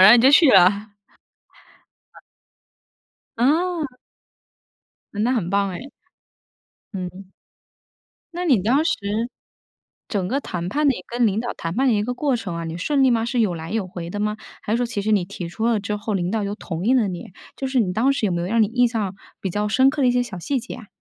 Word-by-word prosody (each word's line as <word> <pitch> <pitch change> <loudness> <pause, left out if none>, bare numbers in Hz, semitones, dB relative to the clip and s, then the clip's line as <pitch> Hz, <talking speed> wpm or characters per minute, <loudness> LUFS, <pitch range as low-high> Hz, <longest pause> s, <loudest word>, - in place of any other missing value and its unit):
然 190 - +10
后 240 - +9
你 230 - +3
就 265 - +7
去 290 0 +7
了。 200 +2 +4 1.2
嗯。 - - -14 1.2
哦。 310 +2 +1 1.2
嗯， 205 0 -1
那 245 - +2
很 200 -9 -1
棒 200 0 +1
哎。 180 +5 -6 1.1
嗯。 185 +1 -6 1.1
那 355 +1 -2
你 260 - +4
当 260 +8 +3
时， 335 - +1 1.1
整 195 -4 -1
个 265 +8 0
谈 175 -7 -4
判 290 +9 +1
的 270 - +4
一 - - -6
你 - - -9
跟 240 0 +1
领 205 +1 0
导 240 +1 -3
谈 165 +1 -5
判 265 +2 +2
的 240 - +4
一 205 - +1
个 245 +4 -3
过 280 -1 +1
程 215 -7 -5
啊， 170 - -4
你 165 0 -5
顺 275 - +1
利 260 - +5
吗？ 225 -1 +1
是 245 +1 -1
有 205 -5 +1
来 165 0 -7
有 220 -3 -1
回 170 -2 -7
的 205 - -5
吗？ 210 +1 -1 0.3
还 210 - -1
是 - - +2
说 245 -1 0
其 210 -3 -3
实 215 - 0
你 205 -4 +3
提 180 -1 -6
出 220 +7 -2
了 230 -2 +2
之 205 +1 -3
后， 210 0 -3
领 180 0 -1
导 220 -2 0
又 200 +1 -3
同 170 -5 -5
意 255 +4 +4
了 235 -5 +3
你。 185 0 -6 0.2
就 270 - -3
是 260 -1 +1
你 185 -6 +1
当 250 +7 +3
时 275 -5 0
有 190 - +1
没 175 - -1
有 175 - -3
让 225 +3 +3
你 - - +3
印 245 +2 +3
象 210 -5 -3 0.2
比 190 - -3
较 210 +3 -1
深 260 +5 +4
刻 295 0 -2
的 260 - +4
一 - - +4
些 245 0 +2
小 190 -7 -8
细 265 +9 -1
节 240 - -8
啊？ 225 -5 -12
215 Hz, 250 characters per minute, -22 LUFS, 190-250 Hz, 1.2 s, 然